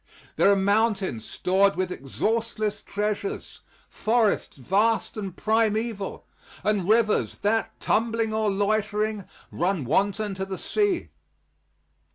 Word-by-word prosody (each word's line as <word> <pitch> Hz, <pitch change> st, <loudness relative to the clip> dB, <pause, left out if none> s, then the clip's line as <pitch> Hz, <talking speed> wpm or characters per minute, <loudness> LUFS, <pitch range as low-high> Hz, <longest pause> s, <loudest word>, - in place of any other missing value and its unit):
There 200 Hz, -, +5 dB
are -, -, +5 dB
mountains 200 Hz, -, +1 dB
stored 195 Hz, +2 st, +2 dB
with 185 Hz, 0 st, -1 dB
exhaustless 215 Hz, -, -2 dB
treasures; 210 Hz, -, -3 dB, 0.3 s
forests 220 Hz, -6 st, 0 dB
vast 205 Hz, -, +1 dB
and 195 Hz, -4 st, -5 dB
primeval; 220 Hz, -1 st, 0 dB, 0.4 s
and 205 Hz, -3 st, 0 dB
rivers 220 Hz, -1 st, +3 dB
that, 220 Hz, +2 st, 0 dB
tumbling 225 Hz, 0 st, 0 dB
or 220 Hz, -1 st, +1 dB
loitering, 210 Hz, 0 st, 0 dB, 0.3 s
run 175 Hz, -5 st, -1 dB
wanton 200 Hz, -, +1 dB
to 190 Hz, 0 st, -3 dB
the 190 Hz, -1 st, -5 dB
sea. 410 Hz, -, 0 dB
210 Hz, 110 wpm, -25 LUFS, 195-220 Hz, 0.4 s, There